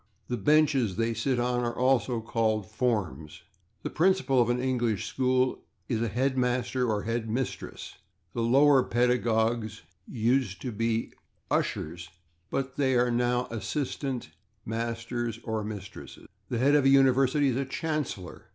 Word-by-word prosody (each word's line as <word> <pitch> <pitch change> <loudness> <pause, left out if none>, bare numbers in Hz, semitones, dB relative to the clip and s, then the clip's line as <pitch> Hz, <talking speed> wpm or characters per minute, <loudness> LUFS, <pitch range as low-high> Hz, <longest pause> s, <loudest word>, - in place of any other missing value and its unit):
The 125 - 0
benches 135 -3 +3
they 115 +1 0
sit 120 +3 0
on 125 0 0
are 120 0 -2
also 125 -2 +2
called 110 -2 0
/forms/. 100 -9 -2 0.4
The - - -4
principal 165 -7 +3
of 120 - +1
an 120 +1 +1
English 120 -5 0
school 130 +2 0 0.2
is 115 -3 -1
a 115 - 0
/head 130 +5 0
master/ 125 0 0
or 105 -2 -1
/head 115 0 -2
mistress/; 125 +4 -4 0.3
the 115 - -2
lower 135 +4 +5
pedagogues 115 -3 0 0.2
used 120 -3 0
to 125 - -3
be 115 +1 -1 0.4
/ushers/, 85 +2 -2 0.4
but 135 0 -3
are 125 -3 +3
now 120 +1 +1
/assistant 125 - -3 0.4
masters/ 115 +1 -3
(or 110 -1 -2
/mistresses/). 105 -2 -8 0.2
The 120 - -1
head 135 +5 +3
of 145 -2 +4
a - - +6
university 135 +1 +4
is 125 - -1
a 135 - -1
/chancellor 150 - -4
120 Hz, 140 wpm, -28 LUFS, 110-130 Hz, 0.4 s, a